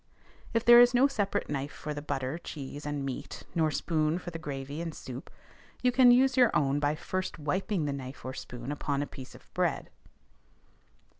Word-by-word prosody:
If 230 +1 +2
there 240 0 +10
is 245 0 +5
no 255 +3 +6
separate 210 -8 0
knife 140 0 -3
for 150 - -6
the 145 - -5
butter, 140 +1 -3
cheese, 145 -2 -7
and 145 -2 -2
meat, 135 -2 -6
nor 160 -2 +2
spoon 155 +1 0
for 180 -1 -7
the 165 - -6
gravy 145 0 -5
and 165 -2 -5
soup, 125 0 -8 0.5
you 250 - +4
can 250 0 +6
use 260 +2 +5
your 250 -3 +6
own 140 -1 +2
by 145 +1 +1
first 185 +4 -3
wiping 175 +3 -1
the 145 - -1
knife 130 -1 -8
or 130 - -4
spoon 125 0 -7
upon 145 -1 -1
a - - -3
piece 130 -2 -11
of - - -16
bread. - - -1
150 Hz, 195 wpm, -30 LUFS, 140-190 Hz, 0.5 s, there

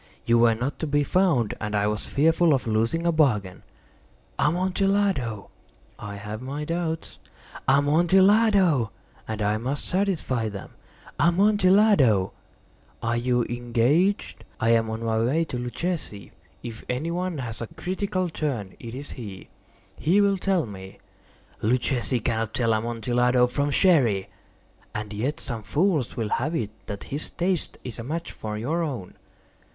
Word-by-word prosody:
You 115 0 +4
were 115 -1 +5
not 125 +6 -3
to 160 - -2
be 145 0 +2
found, 160 - +2
and 105 -1 -2
I 100 0 +2
was 105 +1 -1
fearful 160 +1 +3
of 130 - -3
losing 115 +9 0
a 170 - +4
bargain." 105 - +1 0.8
"Amontillado!" 185 - 0 0.5
"I 105 0 -6
have 105 +2 -6
my 140 +4 -4
doubts." 165 0 -3 0.5
"Amontillado!" 175 - +4 0.4
"And 110 -1 -3
I 105 +1 +1
must 135 +5 -2
satisfy 175 - 0
them." 100 -2 -8 0.5
"Amontillado!" 185 - +4 0.7
"As 120 +1 0
you 125 -1 +2
are - - -5
engaged, 120 - 0 0.2
I 115 +1 +2
am 115 -1 +3
on 110 +1 -4
my 110 -1 +1
way 155 +8 +1
to 125 - -5
Luchesi. 125 - -4 0.3
If 115 -2 -7
any 135 +7 -2
one 180 -1 -2
has 115 -4 -5
a 115 - -4
critical 185 - -2
turn, 135 - -3
it 115 0 -8
is 140 +2 -7
he. 100 -6 -9 0.5
He 175 +7 +3
will 200 -1 +3
tell 185 -4 +1
me—" 95 -3 -10 0.6
"Luchesi 125 +1 0
cannot 110 -1 -1
tell 115 -2 +2
Amontillado 120 +2 +2
from 140 +4 -1
Sherry." 135 - +3 0.7
"And 105 0 -4
yet 125 +8 -2
some 115 -4 -4
fools 155 - 0
will 110 -3 -1
have 150 +10 -1
it 110 -8 -2 0.2
that 100 -2 -5
his 145 +3 -4
taste 180 -1 -1
is 120 -3 -3
a - - -4
match 165 +7 -4
for 105 -1 -5
your 155 +10 -1
own." 130 - -4
130 Hz, 145 wpm, -25 LUFS, 115-170 Hz, 0.8 s, were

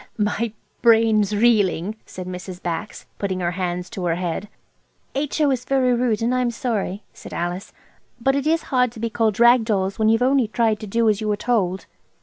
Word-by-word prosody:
"My 210 +1 0 0.3
brain's 220 -3 +4
reeling," 205 -4 +2
said 185 - -7
Mrs. 180 0 -7
Bax, 175 +4 -5
putting 190 -2 -2
her 175 0 0
hands 180 0 -3
to 190 -6 -4
her 165 -1 +1
head. 180 +3 -3 0.6
"H.O. 290 +1 +1
is 250 -2 -1
very 255 -1 +2
rude, 235 -3 0
and 240 +2 +1
I 255 - +1
am 245 - +1
sorry," 220 -5 -3
said - - -10
Alice, 175 +3 -3 0.5
"but 270 +3 +2
it 280 +1 -1
is 325 +1 +2
hard 250 -2 +3
to 230 - -10
be 230 0 -2
called 220 -2 0
rag 240 0 +6
dolls, 195 -3 -1
when 220 0 +3
you've 225 +2 +3
only 260 -2 +3
tried 220 -1 +1
to 215 - -7
do 230 +3 +1
as 210 0 +2
you 215 - -2
were 210 -1 +1
told." 195 -6 0
220 Hz, 200 wpm, -22 LUFS, 190-240 Hz, 0.6 s, rag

